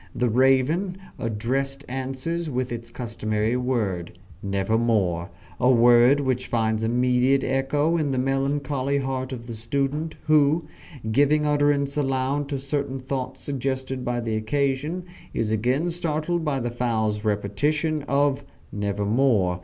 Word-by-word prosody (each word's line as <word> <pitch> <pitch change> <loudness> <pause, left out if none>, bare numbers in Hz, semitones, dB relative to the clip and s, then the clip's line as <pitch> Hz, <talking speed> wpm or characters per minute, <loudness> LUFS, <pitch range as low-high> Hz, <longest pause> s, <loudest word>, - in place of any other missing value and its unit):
The 120 0 +1
raven 135 - +2 0.2
addressed, 135 +5 -2
answers 135 +6 -3
with 125 -2 -2
its 115 -1 -5
customary 110 -1 -2
word, 105 -9 -2 0.2
"Nevermore" 100 -3 0 0.3
a 125 - +4
word 120 +3 +6
which 130 -2 -1
finds 110 -1 0
immediate 125 +3 +2
echo 145 +5 +1
in 155 -3 0
the 135 - -1
melancholy 135 +1 0
heart 130 -1 -2
of 120 -3 -6
the 120 - -6
student, 140 +7 -2
who, 155 +1 +3 0.5
giving 145 +5 +3
utterance 145 -1 +2
aloud 135 +1 0
to 140 - -1
certain 140 0 -2
thoughts 130 0 -4
suggested 130 -1 -3
by 120 0 -1
the 115 -1 -2
occasion, 140 +9 -1 0.3
is 110 -1 0
again 125 +10 +1
startled 165 0 -1
by 145 -3 0
the 120 -1 -2
fowl's 110 -3 -1
repetition 145 +10 0
of 140 0 +2 0.3
"Nevermore." 105 -1 +1
130 Hz, 130 wpm, -24 LUFS, 115-140 Hz, 0.5 s, word